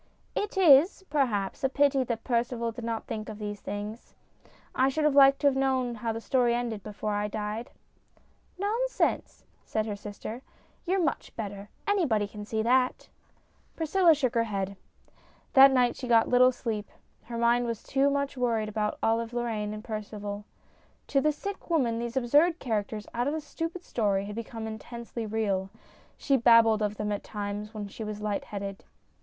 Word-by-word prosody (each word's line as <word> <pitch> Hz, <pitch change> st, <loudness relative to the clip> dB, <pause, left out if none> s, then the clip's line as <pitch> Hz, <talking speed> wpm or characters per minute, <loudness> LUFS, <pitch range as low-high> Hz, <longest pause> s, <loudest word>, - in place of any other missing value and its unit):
" -, -, -38 dB
It 415 Hz, -1 st, -6 dB
is, 345 Hz, +2 st, +6 dB
perhaps, 235 Hz, -10 st, 0 dB
a 265 Hz, -, +3 dB
pity 280 Hz, -1 st, +3 dB
that 230 Hz, -2 st, -3 dB
Percival 235 Hz, -1 st, 0 dB
did 230 Hz, +1 st, -8 dB
not 230 Hz, -1 st, -3 dB
think 215 Hz, -1 st, -5 dB
of 215 Hz, -, -7 dB
these 205 Hz, -1 st, -5 dB
things. 210 Hz, +3 st, -6 dB, 0.6 s
I 260 Hz, +1 st, +3 dB
should 305 Hz, +3 st, -1 dB
have 300 Hz, -1 st, +3 dB
liked 275 Hz, 0 st, +6 dB
to 290 Hz, -, +4 dB
have 275 Hz, -, +3 dB
known 260 Hz, -2 st, +1 dB
how 230 Hz, 0 st, -3 dB
the 225 Hz, -, -4 dB
story 240 Hz, 0 st, +2 dB
ended 235 Hz, -3 st, -3 dB
before 210 Hz, +1 st, -4 dB
I 205 Hz, 0 st, 0 dB
died." 210 Hz, +3 st, -4 dB, 0.5 s
" -, -, -36 dB
Nonsense! 455 Hz, +6 st, -1 dB
" -, -, -38 dB
said 215 Hz, -1 st, -1 dB
her 210 Hz, -2 st, -3 dB
sister. 210 Hz, +3 st, -7 dB, 0.2 s
" -, -, -35 dB
You're 375 Hz, 0 st, +2 dB
much 290 Hz, -, -2 dB
better. 205 Hz, -2 st, -6 dB, 0.2 s
Anybody 290 Hz, -, +2 dB
can 210 Hz, 0 st, -9 dB
see 220 Hz, +1 st, -1 dB
that." 250 Hz, +2 st, +2 dB, 0.7 s
Priscilla 330 Hz, +1 st, +4 dB
shook 260 Hz, -5 st, 0 dB
her 230 Hz, -1 st, +2 dB
head. 200 Hz, -2 st, -3 dB, 0.8 s
That 270 Hz, 0 st, +9 dB
night 250 Hz, -2 st, +3 dB
she 255 Hz, -, -6 dB
got 230 Hz, -2 st, +5 dB
little 250 Hz, +1 st, +5 dB
sleep; 220 Hz, -4 st, -4 dB, 0.4 s
her 235 Hz, 0 st, -6 dB
mind 235 Hz, +1 st, +3 dB
was 230 Hz, -2 st, -5 dB
much 280 Hz, +1 st, +2 dB
worried 230 Hz, -4 st, 0 dB
about 210 Hz, 0 st, -1 dB
Olive 225 Hz, +1 st, +1 dB
Lorraine 225 Hz, -3 st, -2 dB
and 215 Hz, 0 st, -7 dB
Percival. 210 Hz, -2 st, -5 dB, 0.6 s
To 275 Hz, -, +3 dB
the 305 Hz, -, +3 dB
sick 395 Hz, +7 st, -7 dB
woman 245 Hz, -9 st, +1 dB
these 235 Hz, +2 st, -3 dB
absurd 295 Hz, +7 st, +4 dB
characters 215 Hz, -, -3 dB
out 240 Hz, +2 st, 0 dB
of 290 Hz, -, 0 dB
a -, -, -2 dB
stupid 330 Hz, +3 st, -5 dB
story 200 Hz, -7 st, 0 dB
had 205 Hz, -, -6 dB
become 225 Hz, 0 st, -6 dB
intensely 230 Hz, +1 st, -6 dB
real. 200 Hz, -3 st, -1 dB, 0.5 s
She 275 Hz, -1 st, +2 dB
babbled 230 Hz, -2 st, +5 dB
of 210 Hz, 0 st, -1 dB
them 210 Hz, 0 st, -2 dB
at 205 Hz, -, -3 dB
times 210 Hz, +1 st, -5 dB
when 205 Hz, -1 st, -4 dB
she 210 Hz, +3 st, -8 dB
was 210 Hz, -1 st, -5 dB
light 210 Hz, -1 st, -2 dB
headed. 200 Hz, -1 st, -6 dB
230 Hz, 185 wpm, -28 LUFS, 210-270 Hz, 0.8 s, That